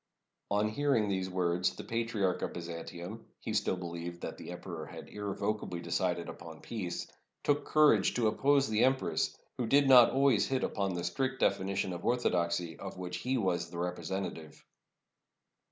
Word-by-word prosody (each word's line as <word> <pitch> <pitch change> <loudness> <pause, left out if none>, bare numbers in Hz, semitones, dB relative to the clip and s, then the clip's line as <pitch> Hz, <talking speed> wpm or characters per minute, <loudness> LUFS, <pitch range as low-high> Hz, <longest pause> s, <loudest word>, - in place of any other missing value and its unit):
On 105 +1 +2
hearing 115 -1 +1
these 95 -1 -1
words, 90 0 +1
the - - -7
Patriarch 115 -5 -1
of - - -2
Byzantium 85 +4 -7
— - - -50
he 110 - -2
still 105 -3 +1
believed 85 0 -6
that - - -5
the - - -10
emperor 85 -3 -6
had - - -9
irrevocably 100 -2 -3
decided 85 0 -1
upon - - -9
peace 95 -7 -4 0.2
— - - -52
took 145 0 +1
courage 155 -1 +4
to 120 - +1
oppose 135 +6 +3
the 110 0 +2
em 130 +1 +5
press, 130 - -1 0.2
who 120 - 0
did 140 +3 +5
not 125 -3 +9
always 135 -5 +3
hit 130 -1 0
upon 95 -2 -1
the 85 - -3
strict 130 +9 -1
definition 95 -1 +1
of 85 - -6
orthodoxy 85 -8 0
of 95 -2 -7
which 90 -1 -4
he 130 +7 -1
was 90 -6 0
the 85 - -8
representative. 90 -3 -4
95 Hz, 170 wpm, -32 LUFS, 85-115 Hz, 0.2 s, not